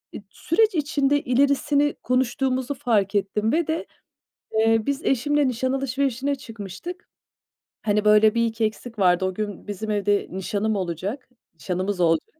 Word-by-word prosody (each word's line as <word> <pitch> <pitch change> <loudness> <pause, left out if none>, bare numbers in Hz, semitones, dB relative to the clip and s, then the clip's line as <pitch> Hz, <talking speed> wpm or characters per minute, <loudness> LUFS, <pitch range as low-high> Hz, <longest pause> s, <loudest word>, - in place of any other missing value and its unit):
e, - - -3
süreç 415 - +1
içinde 290 -2 +1
ilerisini 280 +3 +2
konuştuğumuzu 255 +1 0
fark 210 -6 0
ettim 205 +2 0
ve 325 +2 +1
de, 320 +1 -2 0.7
eee, 225 0 +3
biz 280 +2 -2
eşimle 290 +3 +2
nişan 255 +1 -1
alışverişine 270 0 -1
çıkmıştık. 250 - -9 0.7
Hani, 210 -1 0
böyle, 210 +1 +5
bir 230 0 +3
iki 225 0 0
eksik 220 +1 -5
vardı. 180 -1 +3
O 185 - -1
gün 205 0 -5
bizim 210 +1 -4
evde 205 -1 +1
nişanım 205 +3 -1
olacak, 195 - -4 0.3
nişanımız 185 +3 -3
olacak. 165 -2 +2
225 Hz, 140 wpm, -24 LUFS, 205-275 Hz, 0.7 s, böyle